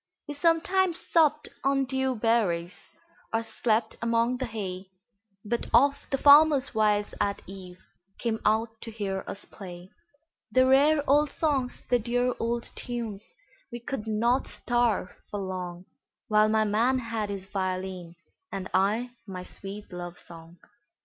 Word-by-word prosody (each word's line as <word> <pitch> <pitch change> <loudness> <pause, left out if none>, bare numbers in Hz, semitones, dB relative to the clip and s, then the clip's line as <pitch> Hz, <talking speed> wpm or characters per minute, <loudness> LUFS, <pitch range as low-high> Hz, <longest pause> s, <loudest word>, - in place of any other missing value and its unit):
We 295 - -4
sometimes 335 +3 +2
supped 305 -2 +2
on 275 0 +2
dew 265 0 -1
berries, 210 -7 0 0.4
Or 225 0 0
slept 225 0 0
among 230 +2 +1
the 255 0 -3
hay, 190 -4 -5 0.6
But 235 +3 -2
oft 280 +4 +3
the 270 - +1
farmers' 285 0 +6
wives 210 -2 +2
at 200 0 -1
eveCame 195 +3 -7
out 225 +1 +1
to 230 - -6
hear 200 -3 -3
us 200 - -7
play; 180 -1 -10 0.6
The 255 0 +5
rare 285 +3 +4
old 295 +2 +4
songs, 275 -6 -1
the 245 -1 +3
dear 245 +2 0
old 235 +1 -1
tunes,—We 240 - -8
could 235 -3 -5
not 235 +4 +1
starve 240 -6 0 0.2
for 205 - -4
longWhile 190 +4 -2
my 220 0 +3
man 230 +5 +2
had 230 -4 -3
his 195 -2 -5
violin, 185 -3 -4 0.4
And 190 -1 -5
I 210 +6 +1 0.2
my 185 -2 -6
sweet 195 +2 -9
love 175 -1 -6
song. 165 +1 -13
225 Hz, 135 wpm, -27 LUFS, 195-255 Hz, 0.6 s, farmers